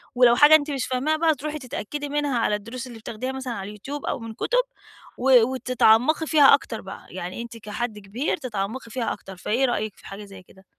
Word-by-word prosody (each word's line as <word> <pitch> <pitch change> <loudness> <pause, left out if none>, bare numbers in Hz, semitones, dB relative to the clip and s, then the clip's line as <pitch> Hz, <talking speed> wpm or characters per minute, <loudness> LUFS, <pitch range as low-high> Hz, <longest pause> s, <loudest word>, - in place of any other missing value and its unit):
ولو 245 -1 +6
حاجة 295 +3 +8
أنتِ 300 -1 +1
مش 275 -2 -2
فاهماها 270 +5 0
بقى، 320 -1 +3
تروحي 305 +3 -5
تتأكدي 285 +3 -5
منها 290 -3 0
على 210 - +1
الدروس 230 +5 -7
اللي 235 -2 -10
بتاخديها 230 +4 -5
مثلًا 265 -2 -5
على 195 - -5
اليوتيوب 240 +8 -7
أو - - -2
من 225 -1 -7
كُتب، - - +1 0.5
و 250 -2 +6
وتتعمّقي 255 +4 +3
فيها 295 -4 +7
أكتر 235 -5 0
بقى، 195 - -10
يعني 180 +4 -6
أنتِ 235 -1 -8
كحد 215 0 -5
كبير 215 +9 -2
تتعمّقي 230 -2 -5
فيها 235 -1 -2
أكتر. 195 -2 -11
فإيه 235 +8 0
رأيِك 215 -4 -2
في - - -15
حاجة 200 +1 -8
زي 195 -2 -13
كده؟ 190 +1 -21
245 Hz, 205 wpm, -24 LUFS, 215-280 Hz, 0.5 s, حاجة